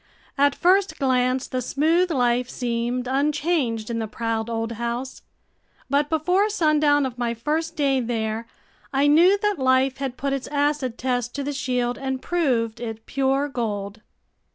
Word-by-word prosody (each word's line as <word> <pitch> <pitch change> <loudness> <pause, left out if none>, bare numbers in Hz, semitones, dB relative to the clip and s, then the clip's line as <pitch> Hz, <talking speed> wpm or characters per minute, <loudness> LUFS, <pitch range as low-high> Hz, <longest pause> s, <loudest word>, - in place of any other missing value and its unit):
At 285 0 +3
first 380 +2 +3
glance 255 -1 +1
the 255 - -2
smooth 320 +8 +2
life 250 -4 +1
seemed 240 +1 -2
unchanged 280 -4 0
in 230 - -2
the 220 - -2
proud 225 0 -3
old 225 0 -2
house. 235 +3 -4 0.7
But 290 +1 +2
before 360 +6 +2
sundown 305 -7 +3
of 250 -1 -6
my 235 -1 -1
first 315 +7 -2
day 275 -3 +2
there, 225 -1 -2 0.4
I 275 0 +2
knew 340 +7 +6
that 415 -5 +1
life 260 0 +2
had 265 -2 -4
put 275 0 -1
its 275 -2 -3
acid 285 -4 0
test 245 -1 -2
to 280 - -2
the 290 +1 -3
shield 250 -2 -1
and 265 -1 -2
proved 250 -9 0
it 225 -2 -6
pure 270 +1 0
gold. 210 -5 -4
260 Hz, 155 wpm, -23 LUFS, 235-290 Hz, 0.7 s, knew